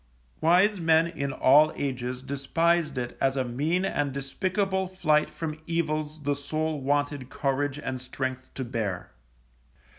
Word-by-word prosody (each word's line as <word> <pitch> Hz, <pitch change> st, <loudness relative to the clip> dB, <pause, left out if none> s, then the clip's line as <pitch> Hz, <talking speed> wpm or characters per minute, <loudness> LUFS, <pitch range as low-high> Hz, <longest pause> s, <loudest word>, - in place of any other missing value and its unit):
Wise 185 Hz, +4 st, +4 dB
men 165 Hz, 0 st, +5 dB
in 140 Hz, -5 st, -3 dB
all 150 Hz, +4 st, +5 dB
ages 125 Hz, -2 st, -3 dB
despised 150 Hz, +3 st, +1 dB
it 120 Hz, -1 st, -3 dB
as 135 Hz, 0 st, +2 dB
a 130 Hz, -, +2 dB
mean 150 Hz, +10 st, 0 dB
and 145 Hz, -6 st, 0 dB
despicable 190 Hz, +8 st, -1 dB
flight 155 Hz, -5 st, +2 dB
from 155 Hz, -2 st, -5 dB
evils 155 Hz, -2 st, -2 dB
the 145 Hz, 0 st, +1 dB
soul 155 Hz, +1 st, -2 dB
wanted 145 Hz, -1 st, 0 dB
courage 140 Hz, +1 st, -1 dB
and 130 Hz, -3 st, -4 dB
strength 130 Hz, 0 st, -4 dB
to 130 Hz, -, -3 dB
bear. 110 Hz, -6 st, -3 dB
145 Hz, 140 wpm, -27 LUFS, 135-165 Hz, -, men